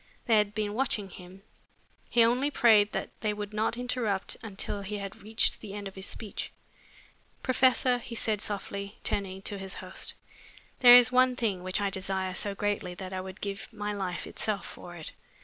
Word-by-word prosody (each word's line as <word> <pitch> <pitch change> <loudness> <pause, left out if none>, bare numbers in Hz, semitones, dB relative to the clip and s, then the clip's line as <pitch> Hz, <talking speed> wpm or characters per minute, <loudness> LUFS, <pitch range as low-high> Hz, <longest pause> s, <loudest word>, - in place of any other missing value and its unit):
They 225 -2 +5
had 210 0 +2
been 210 -1 -1
watching 215 -5 -1
him. 185 +2 -12 0.7
He 235 - +5
only 250 +5 +3
prayed 215 -7 +5
that - - -3
they 215 -1 +1
would 205 0 -5
not 220 +2 0
interrupt 245 -6 0
until 205 -2 -4
he 205 +1 -4
had 200 -1 -7
reached 220 +2 0
the 200 -1 -7
end 205 -1 -5
of 195 - -9
his 190 0 -4
speech. 215 -3 -5 0.9
"Professor," 255 -1 +3
he 235 -1 -8
said 215 -2 0
softly, 200 0 -4
turning 190 -1 -2
to 200 0 -3
his 190 0 -5
host, - - -6 0.6
"there 245 -1 +11
is 245 0 +8
one 255 0 +5
thing 210 -7 -1
which 185 +2 -1
I 200 -1 0
desire 190 -1 -2
so 200 +2 -1
greatly 205 -3 -1
that 185 +1 -7
I 185 - -2
would 190 +1 -9
give 200 +2 -4
my 210 -1 -3
life 185 -3 -3
itself 210 -3 -2
for 175 0 -9
it. 160 -2 -6
205 Hz, 185 wpm, -29 LUFS, 195-225 Hz, 0.9 s, there